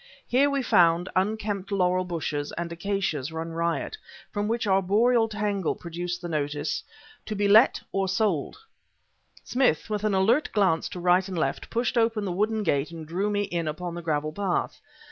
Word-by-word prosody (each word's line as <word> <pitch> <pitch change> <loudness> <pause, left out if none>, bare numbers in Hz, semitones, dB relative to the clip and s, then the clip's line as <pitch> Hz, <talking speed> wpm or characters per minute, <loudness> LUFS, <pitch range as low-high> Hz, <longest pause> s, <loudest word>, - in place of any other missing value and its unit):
Here 275 +4 +3
we 280 -1 0
found 175 -4 +4
unkempt 205 0 -1
laurel 185 -1 +2
bushes 155 -4 -3
and 170 0 -4
acacias 170 -5 -2
run 160 +1 -4
riot, 170 - -2 0.3
from 205 0 -2
which 230 +1 -1
arboreal 210 +5 +3
tangle 205 -4 -1
protruded 175 +1 -5
the 175 - -5
notice 145 -2 -2 0.4
"To 215 - -3
be 205 0 +1
Let 220 +5 +6
or 195 0 0
Sold." 190 - 0 0.9
Smith, 245 - +1
with 210 -1 -1
an 210 -2 +1
alert 225 +10 +3
glance 190 -6 +2
to 180 - -7
right 180 +2 +3
and 185 -2 -5
left, 135 -4 -2
pushed 235 +1 0
open 225 -2 +1
the 185 - -2
wooden 215 +4 0
gate 145 -5 +1
and 165 -2 -8
drew 185 +6 -1
me 205 0 0
in 170 -5 -2
upon 170 +3 -4
the 175 - -5
gravel 155 -2 -1
path. 195 0 -2
190 Hz, 175 wpm, -26 LUFS, 170-210 Hz, 0.9 s, Let